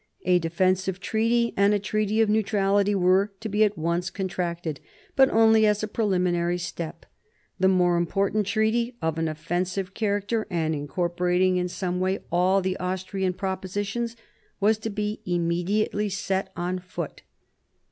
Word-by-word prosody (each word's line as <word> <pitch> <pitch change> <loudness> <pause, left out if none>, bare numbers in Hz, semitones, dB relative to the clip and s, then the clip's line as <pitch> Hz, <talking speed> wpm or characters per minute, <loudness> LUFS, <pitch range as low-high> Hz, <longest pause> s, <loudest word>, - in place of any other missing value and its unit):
A 180 -1 +4
defensive 185 +3 0
treaty 230 +4 +1
and 200 +1 +4
a - - +1
treaty 215 +1 0
of 220 - +4
neutrality 205 -1 +2
were 190 +2 +3
to 225 - -5
be 210 +1 +2
at 210 -2 +1
once 170 +3 -1
contracted, 175 -5 -3 0.4
but 265 0 +6
only 225 0 +5
as 210 0 +1
a - - 0
preliminary 180 -5 0
step. 170 -2 -6 0.5
The 190 - +4
more 180 -2 +3
important 195 +4 0
treaty, 230 +3 0
of 160 0 -1
an 165 - 0
offensive 175 +4 -2
character, 205 +1 -1
and 160 -3 0
incorporating 180 +4 0
in 180 0 0
some 180 0 -3
way 190 +1 +1
all 185 +3 +3
the 185 0 -1
Austrian 185 +1 -2
propositions, 200 +5 -3 0.4
was 215 +2 +3
to 225 - -4
be 210 0 -3
immediately 180 +5 0
set 190 -1 -2
on 180 +1 -2
foot. 180 0 -7
190 Hz, 145 wpm, -25 LUFS, 180-210 Hz, 0.5 s, but